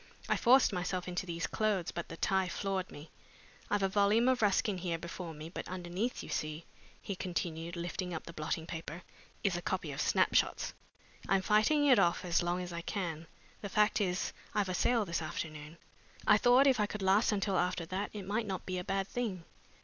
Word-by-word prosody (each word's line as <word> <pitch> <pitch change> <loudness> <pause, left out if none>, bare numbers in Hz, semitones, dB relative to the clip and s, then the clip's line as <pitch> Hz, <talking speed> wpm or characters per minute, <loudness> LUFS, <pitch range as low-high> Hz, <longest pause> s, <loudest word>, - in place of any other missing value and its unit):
I - - +2
forced 255 -2 +5
myself 180 0 -2
into 180 +1 -3
these 170 -1 -2
clothes 210 -5 0
but 170 - -5
the 165 - -7
tie 190 +1 +1
floored 190 +1 -2
me. 150 +2 -11 0.6
I've 205 -1 +1
a - - +4
volume 205 +4 +3
of 255 -2 +2
Ruskin 205 -1 +2
here 170 -2 -2
before 170 +1 -6
me, 155 0 -8
but 170 - -6
underneath, 185 +6 -3
you - - -9
see," 155 +2 -3 0.3
he 200 - -5
continued, 170 -2 -3
lifting 175 +1 -4
up 160 - -4
the 170 - -9
blotting 160 +1 -3
paper, 165 +1 -6 0.4
"is 195 -4 +2
a 175 - -2
copy 175 -4 -2
of 135 - -3
Snapshots. - - +2 0.6
I'm 195 -1 +3
fighting 220 +10 +4
it 265 -4 +6
off 170 +1 +2
as 175 0 +2
long 175 +1 -1
as 175 -1 -7
I 170 - -4
can. 170 -4 -4 0.3
The 200 - -5
fact 210 +2 +3
is 180 -2 -1 0.2
I've 205 -3 +1
a - - -1
sale 230 +4 +2
this 170 -2 -2
afternoon. 155 -1 -6 0.5
I - - +6
thought 250 +2 +6
if 265 -4 +4
I 210 - +2
could 210 -1 -5
last 195 +5 +4
until 200 -1 0
after 180 -1 0
that 185 +4 -3
it 205 -3 -7
might 215 +3 -1
not 190 -2 -4
be 185 -1 -2
a - - -4
bad 195 +1 -1
thing." 210 -8 -3
185 Hz, 205 wpm, -33 LUFS, 170-205 Hz, 0.6 s, it